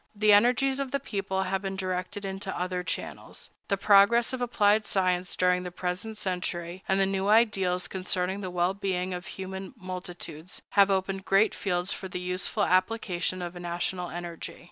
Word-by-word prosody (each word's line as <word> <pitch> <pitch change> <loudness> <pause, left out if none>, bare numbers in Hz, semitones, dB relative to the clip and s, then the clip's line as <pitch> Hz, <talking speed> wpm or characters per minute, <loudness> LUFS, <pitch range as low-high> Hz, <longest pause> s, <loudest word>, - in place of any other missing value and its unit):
The 210 0 +5
energies 250 +5 +4
of 275 -1 -2
the 280 - -1
people 195 -6 -2
have 190 0 -1
been 195 -1 -3
directed 185 +2 -3
into 195 0 -4
other 180 0 -1
channels. 180 - -6 0.2
The 200 - +1
progress 205 +5 +5
of 255 - -3
applied 215 -3 +3
science 185 -1 +1
during 180 0 +3
the 180 - -5
present 180 +5 -4
century, 180 -2 -3
and 190 0 +2
the 195 - +4
new 195 0 -1
ideals 195 -5 +3
concerning 185 +1 -1
the 185 - -4
well 180 +1 +1
being 185 -2 -2
of 180 +1 -6
human 190 +3 -7
multitudes, 180 -3 -7
have 200 -1 +5
opened 190 0 -1
great 195 +3 +4
fields 180 0 -1
for 190 - -6
the 180 - -5
useful 180 +1 -1
application 185 -1 +1
of 175 0 -5
national 175 0 -3
energy. 175 -1 -6
190 Hz, 170 wpm, -28 LUFS, 180-200 Hz, 0.2 s, The